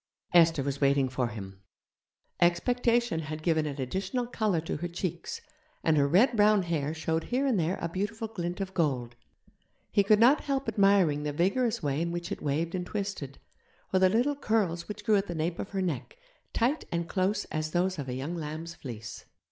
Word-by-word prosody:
Esther 165 -4 +5
was 140 +1 -3
waiting 140 -1 +3
for 130 -1 -1
him. 95 -4 -8 0.8
Expectation 235 +3 +2
had 155 0 -6
given 160 -2 +2
an 145 -1 -5
additional 195 - -2
colour 215 -7 0
to 160 - -3
her 175 - -3
cheeks, 175 0 -4 0.4
and 160 - +3
her 140 -1 +4
red 220 - +4
brown 210 -2 +5
hair 155 -4 -1
showed 160 +1 -2
here 255 +3 0
and 250 -8 +2
there 170 +3 0
a - - -2
beautiful 205 +6 -3
glint 175 -4 -4
of 190 -1 -4
gold. 130 -9 0 0.8
He 200 - +4
could 210 +2 +5
not 250 +6 +5
help 275 -2 -1
admiring 195 -8 +3
the 150 0 -2
vigorous 225 - +1
way 145 +1 0
in 170 0 -1
which 175 +2 -4
it - - -4
waved 155 +4 -1
and 180 -1 -2
twisted, 190 -8 -4 0.6
or 190 - +4
the 185 0 +5
little 245 +8 +2
curls 205 -10 0
which 210 0 -7
grew 215 -2 +4
at 195 - -1
the 175 - -4
nape 165 +2 -2
of - - -4
her 195 -1 -2
neck, 165 - -3 0.3
tight 260 +7 +1
and 170 0 -1
close 195 +3 0
as 155 0 -2
those 180 +1 0
of 135 -2 -4
a 125 - -3
young 145 +7 -4
lamb's 160 +1 -5
fleece. 115 -7 -8
175 Hz, 195 wpm, -29 LUFS, 155-205 Hz, 0.8 s, Esther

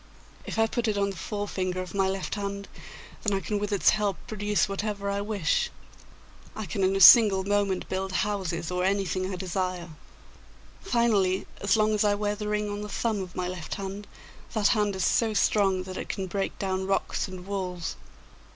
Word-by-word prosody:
If - - -4
I 225 - +4
put 235 +1 -1
it 210 -2 0
on 200 0 +1
the - - -9
forefinger 185 -2 -3
of 185 -2 -6
my 195 -1 +2
left 190 -1 -3
hand, 200 -1 -4 0.5
then 205 -3 +1
I - - -1
can 205 +1 -2
with 205 +1 -3
its 200 - +4
help 205 -3 0
produce 210 -1 0
whatever 200 0 -3
I 200 0 -1
wish. 205 -6 0 0.9
I 215 - -4
can 190 +3 -2
in 190 +1 +3
a - - +1
single 195 0 +9
moment 200 -2 0
build 190 0 -2
houses 180 -4 -1
or 180 0 0
anything 190 -1 0
I - - -3
desire. 180 -1 -3 0.9
Finally, 215 - +2
as 200 +1 +2
long 215 0 +3
as 210 - +2
I 205 -1 +3
wear 205 0 -1
the 210 0 -5
ring 210 0 0
on 205 0 -4
the 210 - -6
thumb 215 -1 -1
of 180 -1 -8
my 180 -1 -2
left 180 -3 -5
hand, 200 +1 -6 0.5
that 215 -3 +3
hand 210 -3 +1
is 190 - 0
so 225 -2 +2
strong 195 -3 +2
that 185 0 -7
it - - -6
can 195 - -3
break 195 +1 -3
down 190 -1 -2
rocks 195 - 0
and 185 -1 -9
walls. 185 -3 -3
200 Hz, 195 wpm, -27 LUFS, 185-210 Hz, 0.9 s, single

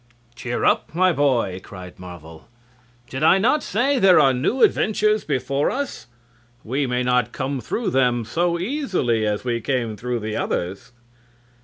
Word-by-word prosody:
"Cheer 120 0 -3
up, - - +1
my 185 0 +3
boy!" 120 - 0
cried 90 -2 -11
Marvel. 85 -3 -11 0.6
"Did 135 - -6
I 160 +4 +5
not 235 +9 +2
say 255 +6 0
there 190 -5 +6
are 135 -3 +4
new 140 - 0
adventures 215 0 +2
before 140 0 -1
us? 280 0 -4 0.6
We 135 +4 -1
may 125 0 -1
not 125 0 +1
come 135 0 -3
through 220 - -2
them 125 -3 +1
so 170 +8 0
easily 180 - -1
as 105 0 -2
we 120 -2 -2
came 120 -4 -2
through 120 +1 -3
the 110 0 -4
others." 95 +7 -3
130 Hz, 155 wpm, -22 LUFS, 115-175 Hz, 0.6 s, there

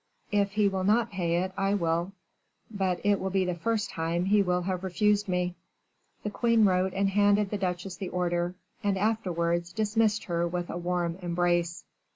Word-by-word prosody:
"If 200 -1 +1
he 210 -1 +3
will 190 -1 -1
not 225 +4 +2
pay 175 -2 0
it, 190 - -4
I 195 +1 +1
will; 170 0 0 0.6
but 190 -4 -1
it 205 -1 +3
will 190 - -2
be 190 0 +1
the 180 - -1
first 210 +5 -1
time 165 +2 -1
he 205 +1 +4
will 180 -2 0
have 185 0 -2
refused 205 +2 +1
me." 180 -1 0 0.7
The 210 - -3
queen 230 0 +3
wrote 185 -1 +2
and 195 0 +2
handed 205 0 +3
the 210 - -2
duchesse 180 0 -3
the 190 - -4
order, 175 0 -1 0.3
and 200 -1 +1
afterwards 175 -5 0
dismissed 215 +2 +1
her 170 -2 -1
with 175 0 -3
a - - -5
warm 175 0 -2
embrace. 175 -1 0
185 Hz, 185 wpm, -28 LUFS, 175-205 Hz, 0.7 s, he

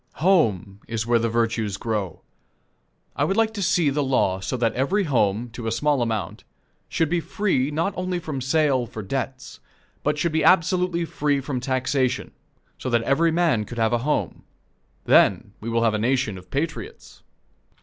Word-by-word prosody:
Home 110 - +1
is 115 -1 -2
where 120 0 +3
the 115 0 0
virtues 115 -3 0
grow. 105 -8 -3 0.9
I - - 0
would 195 - 0
like 225 -1 +2
to 205 - -4
see 175 -5 +2
the 145 +2 0
law 130 -8 +1
so 95 +7 -3
that 115 -2 +1
every 185 +11 +1
home, 115 - 0
to 120 0 -6
a - - 0
small 145 +2 +1
amount, 115 -3 -3 0.5
should 165 - +1
be 175 +3 0
free 165 -7 0
not 165 +6 -1
only 185 0 -2
from 155 -6 -5
sale 135 -2 +1
for 110 -1 -7
debts, 130 +4 -5 0.4
but 150 0 0
should 170 +2 0
be 160 0 +1
absolutely 180 -1 +3
free 145 -3 0
from 130 -1 -3
taxation, 130 0 -1 0.5
so 130 - -3
that 120 -1 +2
every 155 +7 +2
man 160 -10 +2
could 120 +3 -9
have 115 +1 +1
a 120 - +2
home. 150 +5 -1 0.6
Then 100 +2 +4
we 115 - -4
will 115 0 +1
have 115 -2 +3
a 110 - 0
nation 125 -2 0
of 90 0 -12
patriots. 155 +3 -5
130 Hz, 180 wpm, -23 LUFS, 115-160 Hz, 0.9 s, Then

